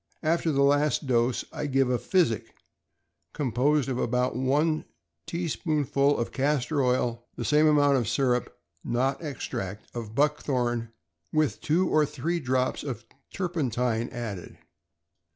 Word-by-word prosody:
After 165 Hz, +1 st, +1 dB
the 140 Hz, -1 st, +3 dB
last 145 Hz, +2 st, +2 dB
dose 120 Hz, -1 st, +1 dB
I 150 Hz, -, -3 dB
give 135 Hz, -2 st, +2 dB
a 125 Hz, -, +1 dB
physic, 165 Hz, -, 0 dB, 0.8 s
composed 140 Hz, +2 st, +1 dB
of 130 Hz, -2 st, -2 dB
about 125 Hz, 0 st, 0 dB
one 145 Hz, +5 st, +1 dB, 0.4 s
tea 170 Hz, 0 st, -2 dB
spoonful 145 Hz, -3 st, +1 dB
of 120 Hz, -, -2 dB
castor 140 Hz, +1 st, 0 dB
oil, 120 Hz, -2 st, 0 dB
the -, -, -4 dB
same 150 Hz, +1 st, +4 dB
amount 145 Hz, -2 st, +4 dB
of 120 Hz, -5 st, -1 dB
syrup 125 Hz, +1 st, 0 dB, 0.3 s
(not 130 Hz, +4 st, 0 dB
ex 145 Hz, -5 st, -4 dB
tract) 100 Hz, +3 st, -5 dB
of 115 Hz, -2 st, -6 dB
buckthorn, 125 Hz, -5 st, 0 dB, 0.4 s
with 155 Hz, -2 st, +1 dB
two 170 Hz, +5 st, +2 dB
or 155 Hz, -, +3 dB
three 170 Hz, +4 st, -2 dB
drops 130 Hz, -2 st, 0 dB
of 120 Hz, -5 st, -5 dB, 0.3 s
turpentine 125 Hz, -, -1 dB
added. 110 Hz, -7 st, -6 dB
135 Hz, 135 wpm, -27 LUFS, 120-150 Hz, 0.8 s, same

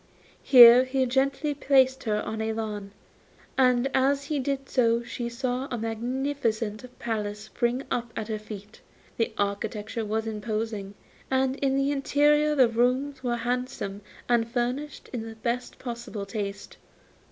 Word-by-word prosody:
Here 245 Hz, -1 st, +9 dB
he 260 Hz, 0 st, +1 dB
gently 275 Hz, +4 st, 0 dB
placed 265 Hz, -2 st, +3 dB
her 210 Hz, -1 st, 0 dB
on 220 Hz, 0 st, -4 dB
a 220 Hz, 0 st, -1 dB
lawn, 210 Hz, -2 st, -4 dB, 0.7 s
and 250 Hz, -1 st, +3 dB
as 275 Hz, +1 st, +2 dB
he 290 Hz, 0 st, -2 dB
did 275 Hz, 0 st, -2 dB
so 235 Hz, -2 st, +2 dB
she 240 Hz, 0 st, -4 dB
saw 255 Hz, +2 st, -2 dB
a 245 Hz, -, -3 dB
magnificent 230 Hz, -1 st, -2 dB
palace 210 Hz, -2 st, -3 dB
spring 240 Hz, +4 st, -1 dB
up 235 Hz, -1 st, -2 dB
at 215 Hz, -, -4 dB
her 215 Hz, -1 st, -3 dB
feet. 210 Hz, 0 st, -10 dB, 0.4 s
The 230 Hz, -, 0 dB
architecture 210 Hz, +2 st, -2 dB
was 220 Hz, +1 st, -2 dB
imposing, 215 Hz, -2 st, -4 dB, 0.3 s
and 265 Hz, 0 st, +1 dB
in 270 Hz, -1 st, +1 dB
the 275 Hz, +1 st, +1 dB
interior 295 Hz, +2 st, +3 dB
the 260 Hz, -4 st, +6 dB
rooms 255 Hz, +4 st, 0 dB
were 240 Hz, -1 st, 0 dB
handsome 240 Hz, -4 st, -3 dB, 0.3 s
and 235 Hz, -1 st, +2 dB
furnished 250 Hz, +5 st, -3 dB
in 240 Hz, -, -2 dB
the 225 Hz, -, -10 dB
best 240 Hz, +2 st, -3 dB
possible 235 Hz, -4 st, -6 dB
taste. 200 Hz, -1 st, -5 dB
240 Hz, 145 wpm, -27 LUFS, 220-265 Hz, 0.7 s, Here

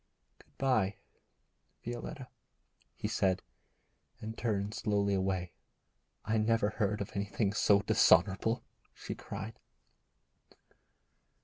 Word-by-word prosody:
'Good -, -, -24 dB
bye, 110 Hz, -7 st, +2 dB, 0.9 s
Violetta,' 125 Hz, +3 st, -5 dB, 0.7 s
he -, -, -3 dB
said, 95 Hz, -1 st, +1 dB, 0.8 s
and 110 Hz, +1 st, -6 dB
turned 105 Hz, -3 st, -1 dB
slowly 100 Hz, -2 st, +1 dB
away. 95 Hz, -2 st, 0 dB, 0.7 s
'I 110 Hz, +1 st, +1 dB
never 110 Hz, -1 st, +2 dB
heard 105 Hz, -1 st, 0 dB
of 100 Hz, -, -4 dB
anything 100 Hz, +1 st, -1 dB
so 100 Hz, -1 st, +4 dB
dishonourable,' 110 Hz, +1 st, +4 dB, 0.3 s
she -, -, -5 dB
cried. 105 Hz, +3 st, -7 dB
105 Hz, 95 wpm, -32 LUFS, 100-110 Hz, 0.9 s, so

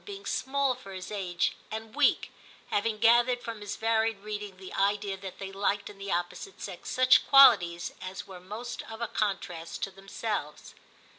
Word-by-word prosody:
being 400 Hz, -1 st, -9 dB
small 275 Hz, 0 st, 0 dB
for 195 Hz, -5 st, -11 dB
his 185 Hz, +1 st, -7 dB
age 185 Hz, -4 st, -1 dB
and 220 Hz, 0 st, -6 dB
weak, -, -, +2 dB, 0.4 s
having 215 Hz, +1 st, +1 dB
gathered 240 Hz, +3 st, +5 dB
from 230 Hz, -3 st, -7 dB
his 205 Hz, -1 st, -4 dB
varied 225 Hz, -1 st, +1 dB
reading 210 Hz, -2 st, -6 dB
the 190 Hz, 0 st, -10 dB
idea 200 Hz, 0 st, +1 dB
that 190 Hz, -1 st, -9 dB
they 195 Hz, 0 st, -6 dB
liked 200 Hz, +1 st, -1 dB
in 200 Hz, -, -17 dB
the 195 Hz, 0 st, -5 dB
opposite 175 Hz, +2 st, -3 dB
sex 190 Hz, -3 st, -7 dB
such 255 Hz, 0 st, +5 dB
qualities 190 Hz, -12 st, +6 dB
as 190 Hz, +2 st, -6 dB
were 190 Hz, -2 st, -10 dB
most 215 Hz, +7 st, -6 dB
of 225 Hz, 0 st, -8 dB
a 235 Hz, -, -2 dB
contrast 190 Hz, -6 st, -3 dB
to 195 Hz, -, -2 dB
them 195 Hz, +1 st, -17 dB
selves. 195 Hz, -8 st, -4 dB
205 Hz, 175 wpm, -29 LUFS, 190-225 Hz, 0.4 s, qualities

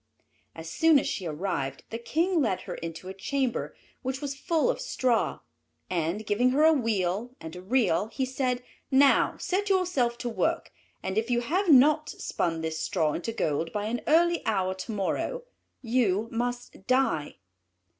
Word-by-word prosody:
As 160 Hz, 0 st, -8 dB
soon 315 Hz, -, +4 dB
as -, -, +1 dB
she 185 Hz, -, -3 dB
arrived 150 Hz, -5 st, -3 dB
the 230 Hz, -, -4 dB
King 330 Hz, +7 st, +1 dB
led 210 Hz, -8 st, 0 dB
her -, -, -6 dB
into 165 Hz, +2 st, -7 dB
a 190 Hz, -, -5 dB
chamber 255 Hz, +5 st, -2 dB, 0.3 s
which 265 Hz, 0 st, -3 dB
was 285 Hz, -1 st, -3 dB
full 315 Hz, -, 0 dB
of -, -, -6 dB
straw; 250 Hz, -, 0 dB, 0.5 s
and, 175 Hz, +5 st, -1 dB
giving 215 Hz, +5 st, +2 dB
her 280 Hz, +4 st, +3 dB
a 320 Hz, 0 st, +7 dB
wheel 225 Hz, -, -1 dB
and 160 Hz, +1 st, -8 dB
a 180 Hz, -, -8 dB
reel, 205 Hz, -3 st, +1 dB
he 260 Hz, +4 st, -2 dB
said, 255 Hz, -1 st, -1 dB, 0.3 s
"Now 270 Hz, +1 st, +4 dB
set 405 Hz, +2 st, -1 dB
yourself 350 Hz, -11 st, +1 dB
to 245 Hz, -, -4 dB
work, 225 Hz, -, -1 dB, 0.3 s
and 190 Hz, +3 st, 0 dB
if 225 Hz, +2 st, -4 dB
you 240 Hz, -1 st, +2 dB
have 350 Hz, +10 st, 0 dB
not 305 Hz, +2 st, +6 dB
spun 165 Hz, -2 st, -2 dB
this 160 Hz, 0 st, -3 dB
straw 160 Hz, -7 st, 0 dB
into 205 Hz, +7 st, -3 dB
gold 165 Hz, -6 st, -1 dB
by 210 Hz, -1 st, -2 dB
an 235 Hz, +3 st, -2 dB
early 340 Hz, +2 st, +3 dB
hour 190 Hz, -4 st, 0 dB
to 190 Hz, +5 st, -6 dB
morrow, 220 Hz, -, -2 dB, 0.4 s
you 225 Hz, -3 st, +1 dB
must 240 Hz, -4 st, -4 dB
die." 255 Hz, -, +1 dB
235 Hz, 170 wpm, -27 LUFS, 185-275 Hz, 0.5 s, a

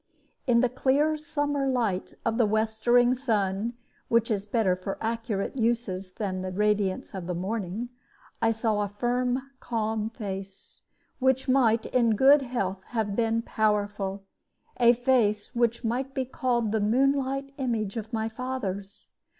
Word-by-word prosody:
In 235 Hz, -2 st, +5 dB
the 250 Hz, -, +4 dB
clear 275 Hz, +5 st, +2 dB
summer 290 Hz, -2 st, -1 dB
light 230 Hz, -8 st, -1 dB
of 230 Hz, +1 st, 0 dB
the 230 Hz, -, +4 dB
westering 225 Hz, +3 st, +3 dB
sun 220 Hz, -4 st, 0 dB, 0.3 s
(which 230 Hz, 0 st, +2 dB
is 205 Hz, -1 st, -1 dB
better 205 Hz, -4 st, +2 dB
for 185 Hz, +2 st, -5 dB
accurate 225 Hz, -2 st, -2 dB
uses 225 Hz, -6 st, -1 dB
than 190 Hz, -3 st, -3 dB
the 185 Hz, -, -3 dB
radiance 205 Hz, -1 st, 0 dB
of 185 Hz, -3 st, -5 dB
the 180 Hz, -, -2 dB
morning) 205 Hz, +4 st, -3 dB, 0.5 s
I 225 Hz, 0 st, +4 dB
saw 220 Hz, -2 st, 0 dB
a 205 Hz, -, 0 dB
firm, 250 Hz, +5 st, -1 dB
calm 220 Hz, -2 st, -2 dB
face, 195 Hz, -4 st, -8 dB, 0.4 s
which 265 Hz, 0 st, +2 dB
might 235 Hz, -4 st, +3 dB
in 235 Hz, -3 st, +2 dB
good 275 Hz, +5 st, +6 dB
health 195 Hz, -7 st, -2 dB
have 220 Hz, -4 st, -2 dB
been 230 Hz, 0 st, +1 dB
powerful 205 Hz, -3 st, -1 dB, 0.5 s
a 240 Hz, -1 st, +6 dB
face 235 Hz, -4 st, +1 dB
which 235 Hz, 0 st, +1 dB
might 255 Hz, +4 st, -2 dB
be 265 Hz, -, 0 dB
called 240 Hz, -3 st, 0 dB
the 220 Hz, -1 st, +1 dB
moonlight 275 Hz, +4 st, +1 dB
image 225 Hz, -6 st, -1 dB
of 220 Hz, -1 st, -5 dB
my 220 Hz, -1 st, -1 dB
father's. 220 Hz, -5 st, -5 dB
225 Hz, 145 wpm, -27 LUFS, 205-250 Hz, 0.5 s, good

